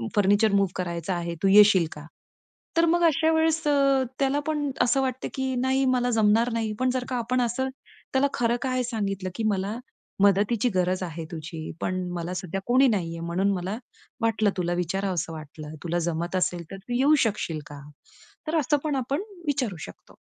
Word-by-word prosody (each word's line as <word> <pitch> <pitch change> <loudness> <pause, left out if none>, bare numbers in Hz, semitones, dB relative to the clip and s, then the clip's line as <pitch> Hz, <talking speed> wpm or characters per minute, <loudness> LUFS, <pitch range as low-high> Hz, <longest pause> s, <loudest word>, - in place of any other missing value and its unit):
Furniture 205 +1 +4
move 195 -2 +3
करायचं 175 0 -3
आहे. 170 -1 -3
तू - - +4
येशील 200 -4 +7
का? 150 -1 -10 0.7
तर 335 - +5
मग 345 +1 +2
अशा 320 +3 +2
वेळेस 320 0 +2
अ, 275 -2 +3 0.2
त्याला 275 +1 +2
पण 295 -2 0
असं 250 +2 +3
वाटतं, 260 -1 -2
की 265 -1 -2
नाही. 265 +1 +2
मला 245 0 +1
जमणार 220 +3 +3
नाही. 220 -2 -1
पण 255 0 +2
जर 250 - -3
का 250 - -1
आपण 250 +2 0
असं 245 +3 -1 0.4
त्याला 270 +2 +3
खरं 235 0 +1
काय 255 -1 0
सांगितलं, 200 -5 -2
की 225 - -3
मला 200 +4 -2 0.5
मदतीची 205 +4 +3
गरज 185 +1 +1
आहे 165 -1 -5
तुझी, 160 0 -7 0.2
पण 185 0 -1
मला 175 +1 -4
सध्या 185 +1 -4
कोणी 260 +2 +5
नाहीये, 165 -6 -2
म्हणून 180 +4 0
मला 185 +4 -3 0.4
वाटलं, 220 -2 +2
तुला 175 -1 0
विचारावस 185 0 -1
वाटलं, 155 -1 -8
तुला 175 0 -1
जमत 170 +3 -3
असेल, 175 -1 0
तर 195 - -6
तू 220 +6 -7
येऊ 295 +3 +5
शकशील 175 -7 -2
का? 145 -1 -10 0.7
तर 320 +1 +1
असं 295 +1 +2
पण 295 -2 0
आपण 270 +6 -1 0.3
विचारू 255 - -1
शकतो. - - -15
210 Hz, 180 wpm, -26 LUFS, 180-260 Hz, 0.7 s, येशील